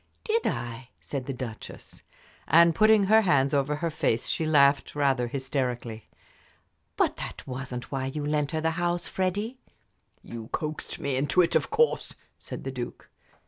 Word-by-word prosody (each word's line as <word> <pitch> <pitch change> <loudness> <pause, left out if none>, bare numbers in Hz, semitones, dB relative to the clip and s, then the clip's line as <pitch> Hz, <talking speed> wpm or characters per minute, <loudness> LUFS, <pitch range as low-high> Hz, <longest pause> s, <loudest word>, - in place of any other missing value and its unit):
"Did 455 0 +1
I?" 120 +1 -4
said 135 -3 -5
the - - -1
Duchess. 120 -3 -8 0.5
And 170 +2 +6
putting 215 +2 +5
her 220 +3 +5
hands 140 -8 +2
over 140 +1 +1
her 165 +2 -2
face 135 -7 0
she 160 - 0
laughed 140 -2 +4
rather 135 -4 +2
hysterically. 125 -4 -3 0.9
"But - - +2
that - - -7
wasn't 125 -2 -6
why 135 -1 -2
you 145 +2 -4
lent 150 -1 0
her 160 -1 -2
the 160 0 +1
house, 175 0 0
Freddie." 205 +7 -2 0.6
"You 115 -1 -8
coaxed 155 -2 -4
me 140 -2 -1
into 140 +5 +3
it, 170 - +1
of - - +2
course," 460 +2 +1 0.2
said - - -8
the - - -4
Duke. - - -7
145 Hz, 160 wpm, -27 LUFS, 130-170 Hz, 0.9 s, And